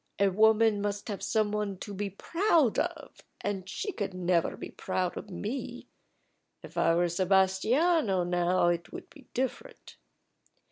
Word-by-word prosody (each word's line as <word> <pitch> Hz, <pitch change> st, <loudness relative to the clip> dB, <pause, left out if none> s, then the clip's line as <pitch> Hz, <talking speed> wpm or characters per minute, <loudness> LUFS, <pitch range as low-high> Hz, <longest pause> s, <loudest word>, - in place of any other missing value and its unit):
"A 200 Hz, 0 st, +3 dB
woman 220 Hz, +1 st, +4 dB
must 205 Hz, +1 st, -3 dB
have 205 Hz, -, -4 dB
some 215 Hz, -2 st, +1 dB
one 210 Hz, -2 st, -2 dB
to 205 Hz, +2 st, -7 dB
be 200 Hz, +1 st, -3 dB
proud 325 Hz, -, +2 dB
of, -, -, -4 dB, 0.2 s
and 195 Hz, -2 st, -3 dB
she 405 Hz, -, -3 dB
could 200 Hz, -, -4 dB
never 175 Hz, -2 st, +1 dB
be -, -, -8 dB
proud 180 Hz, -1 st, -2 dB
of 210 Hz, -, -7 dB
me. 210 Hz, +8 st, -5 dB, 0.7 s
If -, -, -12 dB
I 165 Hz, -, +3 dB
were 175 Hz, +1 st, +2 dB
Sebastiano 190 Hz, -, +2 dB
now, 175 Hz, 0 st, +2 dB
it 170 Hz, -1 st, -2 dB
would -, -, -9 dB
be 280 Hz, -5 st, -16 dB
different." 260 Hz, +1 st, -4 dB
200 Hz, 150 wpm, -29 LUFS, 185-220 Hz, 0.7 s, woman